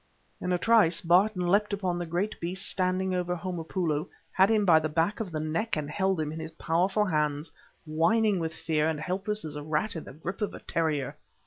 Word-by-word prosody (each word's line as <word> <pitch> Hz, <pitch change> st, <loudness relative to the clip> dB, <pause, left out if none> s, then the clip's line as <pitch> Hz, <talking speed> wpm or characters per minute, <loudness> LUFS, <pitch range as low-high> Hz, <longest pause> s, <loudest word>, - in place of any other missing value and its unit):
In 180 Hz, -, -2 dB
a 180 Hz, -, +3 dB
trice 180 Hz, -6 st, +4 dB
Barton 180 Hz, +2 st, +3 dB
leapt 205 Hz, +4 st, +2 dB
upon 185 Hz, -3 st, -1 dB
the 175 Hz, -, -4 dB
great 180 Hz, +6 st, -2 dB
beast 180 Hz, +3 st, -3 dB
standing 185 Hz, 0 st, 0 dB
over 180 Hz, -1 st, -1 dB
Homopoulo, 170 Hz, -2 st, -2 dB, 0.2 s
had 190 Hz, +2 st, +4 dB
him 215 Hz, -2 st, +3 dB
by 165 Hz, -4 st, +6 dB
the 155 Hz, 0 st, -2 dB
back 165 Hz, +8 st, 0 dB
of 210 Hz, -6 st, -4 dB
the 155 Hz, -, -2 dB
neck 160 Hz, +7 st, -1 dB
and 150 Hz, -1 st, -3 dB
held 190 Hz, 0 st, 0 dB
him 155 Hz, -1 st, -2 dB
in 160 Hz, -, -6 dB
his 160 Hz, 0 st, -7 dB
powerful 185 Hz, +6 st, +1 dB
hands 150 Hz, -3 st, -1 dB, 0.3 s
whining 195 Hz, +6 st, +2 dB
with 160 Hz, -1 st, -2 dB
fear 160 Hz, -1 st, 0 dB
and 155 Hz, -2 st, -2 dB
helpless 195 Hz, +4 st, -3 dB
as 150 Hz, -1 st, -6 dB
a 150 Hz, -, -5 dB
rat 155 Hz, +8 st, -1 dB
in 160 Hz, -, -6 dB
the -, -, -10 dB
grip 170 Hz, +8 st, -6 dB
of 210 Hz, -, -2 dB
a -, -, -8 dB
terrier. 155 Hz, -5 st, -1 dB
175 Hz, 215 wpm, -28 LUFS, 160-195 Hz, 0.3 s, by